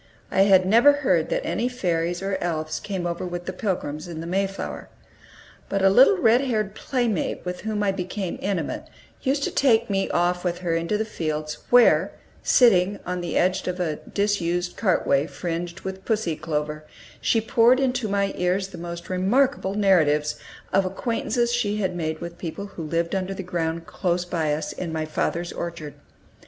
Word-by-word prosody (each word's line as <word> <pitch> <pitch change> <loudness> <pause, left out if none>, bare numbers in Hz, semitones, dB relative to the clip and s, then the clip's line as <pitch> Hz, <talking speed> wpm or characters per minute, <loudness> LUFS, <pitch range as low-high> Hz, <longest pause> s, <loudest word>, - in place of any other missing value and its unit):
I 190 - +3
had 190 -2 +5
never 235 +9 +6
heard 170 -7 +2
that - - -1
any 240 +3 0
fairies 175 -6 -1
or 195 0 -1
elves 155 -2 -2
came 190 -4 -4
over 170 0 -3
with 175 -1 -5
the 185 - -4
Pilgrims 175 -6 -3
in 165 -2 -6
the 165 - -5
Mayflower. 195 +2 -3 0.8
But 195 -1 0
a 195 - +6
little 265 - +6
red 240 -6 +4
haired 215 -7 -1
playmate 235 - -1
with 180 0 -4
whom 215 -1 -2
I 200 - +2
became 185 0 -4
intimate 185 -6 -2 0.3
used 275 +2 0
to - - -1
take 235 -5 +3
me 195 0 0
off 180 +1 +1
with 175 -1 -1
her 170 - +1
into 170 +5 0
the 220 - -1
fields, 155 -6 -3
where, 245 -1 +5 0.3
sitting, 200 -5 +4
on 180 0 -3
the 175 -2 -2
edge 185 +2 +1
of 180 0 -2
a 160 -4 -1
disused 180 -4 -1
cartway 160 -8 +2
fringed 175 +1 -4
with 190 0 -6
pussy 210 -8 0
clover, 150 0 -3 0.4
she 225 - +3
poured 230 +3 +4
into 250 -3 0
my 200 -1 0
ears 185 +2 0
the 180 - -10
most 170 0 -7
remarkable 195 +3 +1
narratives 155 -7 +3 0.4
of 195 - +4
acquaintances 235 +4 -1
she 210 -4 0
had 190 -3 -1
made 160 -2 -2
with 170 0 -7
people 185 +4 -5
who 200 - -9
lived 165 +2 -1
under 190 0 -2
the 195 - -5
ground 165 -2 -2
close 175 -1 -1
by 165 -4 -1
us, 150 +2 -2
in 170 -3 -5
my 160 -1 -2
father's 170 +2 -2
orchard. 170 -4 -5
185 Hz, 180 wpm, -24 LUFS, 170-205 Hz, 0.8 s, never